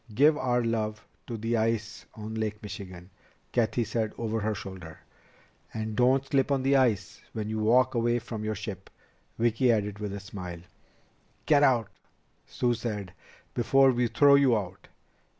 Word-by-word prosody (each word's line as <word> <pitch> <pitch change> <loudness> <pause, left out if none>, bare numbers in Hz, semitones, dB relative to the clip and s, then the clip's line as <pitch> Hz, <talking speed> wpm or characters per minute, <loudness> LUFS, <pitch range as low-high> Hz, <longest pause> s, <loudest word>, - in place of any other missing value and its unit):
"Give 150 +5 +5
our 125 -3 0
love 110 -2 -2 0.2
to 115 - -4
the 115 +2 -1
ice 110 -2 -2
on 110 0 -7
Lake 110 -1 -3
Michigan," 95 -3 -9 0.4
Cathy 120 0 +1
said 110 -1 -2
over 115 -1 -2
her 110 0 -1
shoulder. 90 -5 -9 0.8
"And 110 -1 -3
don't 130 +3 +3
slip 135 0 +1
on 135 -2 +1
the 135 +1 +3
ice 125 -7 +1
when 110 -1 -4
you 110 - -2
walk 125 +4 +3
away 120 0 +1
from 110 -2 -6
your 110 0 -2
ship," 100 -2 -7 0.5
Vicki 120 +2 +3
added 105 -2 -1
with 105 -1 -4
a 100 - -5
smile. 90 -4 -8 0.8
"Get 145 -2 +4
out," 125 -6 +3 0.6
Sue 120 -1 0
said, 105 -5 -4 0.4
"before 135 +3 +4
we 120 -1 +1
throw 140 +4 +5
you 135 -4 +5
out. 95 -2 -7
110 Hz, 160 wpm, -28 LUFS, 105-125 Hz, 0.8 s, Give